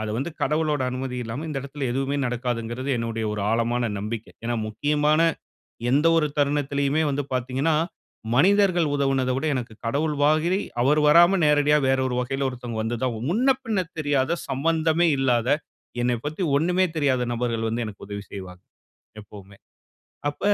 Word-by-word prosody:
அத 110 - -3
வந்து 140 +6 -3
கடவுளோட 150 -1 +1
அனுமதி 130 0 -4
இல்லாம 120 +8 -5
இந்த 145 -3 -3
இடத்துல 140 0 -6
எதுவுமே 135 +2 -1
நடக்காதுங்கிறது 120 +1 -3
என்னுடைய 115 -1 -3
ஒரு 105 -1 -3
ஆழமான 115 +1 +1
நம்பிக்க. 110 +2 -4 0.2
ஏன்னா 120 0 -1
முக்கியமான 150 +6 +1 0.7
எந்த 145 +5 +3
ஒரு 155 - +3
தருணத்துலயுமே 140 +1 +1
வந்து 140 +1 -1
பார்த்தீங்கன்னா, 130 +5 0 0.6
மனிதர்கள் 185 +1 +4
உதவுனத 135 -2 +1
விட 140 - -3
எனக்கு 120 -3 -4
கடவுள் 150 +5 0
மாதிரி 155 +5 +3 0.2
அவர் 150 +4 +3
வராம 175 +5 +6
நேரடியா 150 0 +4
வேறொரு 130 -1 +1
வழியில 135 +2 -1
ஒருத்தவங்க 120 -3 -5
வந்துதான் 120 +1 -2
முன்ன 250 +8 +3
பின்ன 205 -6 0
தெரியாத, 145 +2 +1
சம்மந்தமே 160 +4 +1
இல்லாத, 125 -2 +1 0.5
என்னை 120 0 +1
பத்தி 155 +5 -3 0.2
ஒண்ணுமே 180 +3 +2
தெரியாத 130 -4 +1
நபர்கள் 115 -2 -1
வந்து 115 +1 -2
எனக்கு 105 -2 -9
உதவி 100 0 -6
செய்வாங்க! 90 -2 -8 0.6
எப்பவுமே. 100 -1 -14 0.7
அப்ப - - -17
135 Hz, 145 wpm, -24 LUFS, 120-150 Hz, 0.7 s, வராம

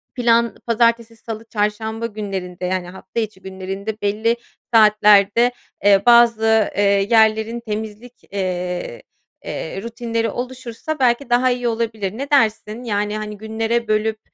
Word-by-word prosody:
plan 235 -2 +2
pazartesi, 230 0 +1
salı, 225 0 -8
çarşamba 220 +2 -2
günlerinde 195 -5 -5
yani 180 -1 -2
hafta 190 +5 -6
içi 215 -4 -4
günlerinde 195 +3 -6
belli 220 +3 +1 0.4
saatlerde, 210 +1 +5 0.3
eee, 200 -1 +5
bazı, 225 -2 +5
eee, 205 - +3 0.3
yerlerin 220 0 +3
temizlik, 220 +2 -7
eee, 180 -7 -3 0.4
eee, 190 +4 -5
rutinleri 230 0 -3
oluşursa 255 +4 -5
belki 245 +1 +2
daha 250 +1 +3
iyi 245 -1 -1
olabilir. 225 -3 -2
Ne 280 +2 -5
dersin? 225 -3 +1
Yani, 210 -2 -1
hani, 210 -1 -6
günlere 225 +2 -2
bölüp, 215 0 0
220 Hz, 125 wpm, -20 LUFS, 205-235 Hz, 0.4 s, saatlerde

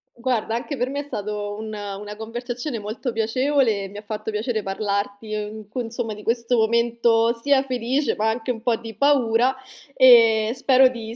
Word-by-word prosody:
Guarda, 235 -2 -1
anche 265 +4 -4
per 255 0 -1
me 285 +1 -3
è - - -3
stato 205 -5 -4
un 220 0 -6
una 205 0 -6
conversazione 240 +3 -4
molto 225 +4 -4
piacevole, 225 -2 +1
mi 205 +2 -11
ha - - -6
fatto 215 +1 -5
piacere 215 +1 -2
parlarti 200 +2 -3
un 210 0 -6
c 230 - -38
insomma, 225 -1 -4
di 210 0 -11
questo 235 +1 0
momento 235 0 +2
sia 280 0 +3
felice, 260 +2 -1
ma 220 +1 +1
anche 230 +2 -2
un 225 -2 -6
po' 240 -1 +1
di 225 -2 -9
paura 255 -2 +3 0.4
e 230 -3 +6
spero 260 0 +5
di 230 -2 -7
230 Hz, 180 wpm, -23 LUFS, 215-250 Hz, 0.4 s, e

